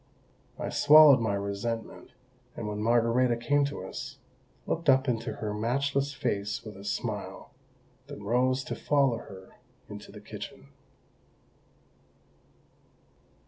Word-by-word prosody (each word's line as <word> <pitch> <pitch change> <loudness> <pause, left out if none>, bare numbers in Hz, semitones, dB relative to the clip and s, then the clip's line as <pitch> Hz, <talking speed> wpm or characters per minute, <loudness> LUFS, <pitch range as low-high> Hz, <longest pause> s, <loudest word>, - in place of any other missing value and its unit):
I - - -4
swallowed 150 -2 +7
my 110 -3 0
resentment, 100 +3 -4 0.4
and - - -5
when 105 0 -4
Margarita 120 +2 +2
came 145 +4 +2
to 145 - -5
us, 140 +3 -7 0.5
looked 165 -2 -1
up 130 +1 +4
into 115 -1 -1
her 105 -1 -4
matchless 140 +6 0
face 105 -6 -2
with 105 -2 -8
a 95 - -11
smile, 100 - -5 0.5
then 105 - -9
rose 130 +4 +1
to - - -5
follow 140 -5 +2
her 95 -3 -13 0.3
into - - -10
the - - -11
kitchen. 70 - -10
120 Hz, 120 wpm, -28 LUFS, 105-140 Hz, 0.5 s, swallowed